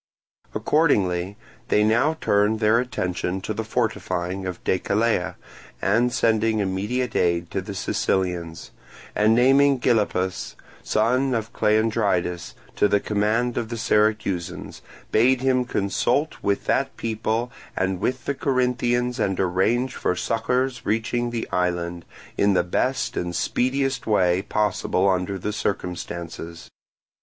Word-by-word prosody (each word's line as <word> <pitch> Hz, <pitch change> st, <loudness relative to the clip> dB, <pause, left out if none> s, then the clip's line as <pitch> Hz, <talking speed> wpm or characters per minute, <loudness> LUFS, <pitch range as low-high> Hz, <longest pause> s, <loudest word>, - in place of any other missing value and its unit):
Accordingly 100 Hz, -, +1 dB, 0.3 s
they 105 Hz, -, +3 dB
now 120 Hz, +9 st, +2 dB
turned 105 Hz, +2 st, +2 dB
their 110 Hz, +1 st, +4 dB
attention 95 Hz, -6 st, -2 dB
to 110 Hz, -, -3 dB
the 110 Hz, +2 st, -3 dB
fortifying 95 Hz, -5 st, -2 dB
of 90 Hz, -, -6 dB
Decelea 100 Hz, 0 st, 0 dB, 0.4 s
and 115 Hz, +5 st, +2 dB
sending 110 Hz, -1 st, +2 dB
immediate 105 Hz, +6 st, -1 dB
aid 85 Hz, -1 st, +1 dB
to 95 Hz, -, -1 dB
the 100 Hz, +1 st, -7 dB
Sicilians; 90 Hz, -3 st, -2 dB, 0.4 s
and 110 Hz, +1 st, +4 dB
naming 135 Hz, +2 st, +4 dB
Gylippus, 100 Hz, -6 st, 0 dB, 0.3 s
son 125 Hz, +4 st, +1 dB
of 110 Hz, 0 st, -3 dB
Cleandridas, 105 Hz, -5 st, 0 dB, 0.2 s
to -, -, +4 dB
the 100 Hz, -, +2 dB
command 110 Hz, +4 st, 0 dB
of 115 Hz, -, -4 dB
the 120 Hz, -, -4 dB
Syracusans, 105 Hz, -5 st, 0 dB, 0.3 s
bade 125 Hz, +3 st, +4 dB
him 130 Hz, -1 st, +2 dB
consult 120 Hz, +8 st, 0 dB
with 100 Hz, 0 st, 0 dB
that 135 Hz, 0 st, 0 dB
people 115 Hz, +2 st, -2 dB, 0.3 s
and 95 Hz, -1 st, 0 dB
with 130 Hz, +5 st, -2 dB
the 140 Hz, -, 0 dB
Corinthians 125 Hz, -2 st, 0 dB
and 95 Hz, -2 st, 0 dB
arrange 95 Hz, +8 st, +1 dB
for 90 Hz, -, -1 dB
succours 125 Hz, +5 st, -1 dB
reaching 115 Hz, +3 st, -1 dB
the 120 Hz, -1 st, -3 dB
island, 85 Hz, -2 st, -1 dB, 0.3 s
in 100 Hz, -1 st, +4 dB
the 90 Hz, -, +3 dB
best 90 Hz, -, -1 dB
and 90 Hz, 0 st, -3 dB
speediest 135 Hz, +1 st, 0 dB
way 90 Hz, -4 st, +3 dB
possible 95 Hz, -2 st, 0 dB
under 95 Hz, +1 st, 0 dB
the 105 Hz, +3 st, -3 dB
circumstances. 85 Hz, -4 st, -5 dB
105 Hz, 125 wpm, -23 LUFS, 95-120 Hz, 0.4 s, their